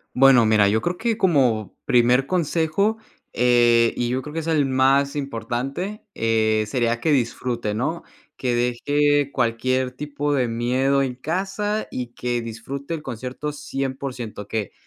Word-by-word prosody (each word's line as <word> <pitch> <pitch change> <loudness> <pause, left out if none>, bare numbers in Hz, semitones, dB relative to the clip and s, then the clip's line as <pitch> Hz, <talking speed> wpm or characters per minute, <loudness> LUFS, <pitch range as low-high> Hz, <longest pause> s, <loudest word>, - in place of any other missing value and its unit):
Bueno, 130 -3 +6
mira, 110 -2 +4
yo 110 +2 +1
creo 175 +1 -2
que 230 -2 -1
como 130 - +1
primer 125 +2 +3
consejo, 175 +5 +1 0.3
eh, 120 -1 +4
y 120 - -1
yo 130 +2 -1
creo 150 +3 -9
que 165 - -2
es 160 - -8
el 155 -3 +2
más 135 +2 +2
importante, 135 - -4
eh, 110 -1 +1
sería 120 0 0
que 155 +5 +1
disfrute, 120 -3 -1
¿no?, 150 +10 -2 0.3
que 125 -2 -1
deje 145 +4 +1
cualquier 125 +1 0
tipo 145 +2 -3
de 125 -4 +1
miedo 130 +4 +1
en 130 -2 -2
casa 195 +9 -2
y 125 -1 -4
que 120 0 -3
disfrute 130 +7 -6
el 155 - -5
concierto 130 +5 -5
100% 135 -6 -5
que, 110 -3 -3
130 Hz, 150 wpm, -22 LUFS, 120-145 Hz, 0.3 s, Bueno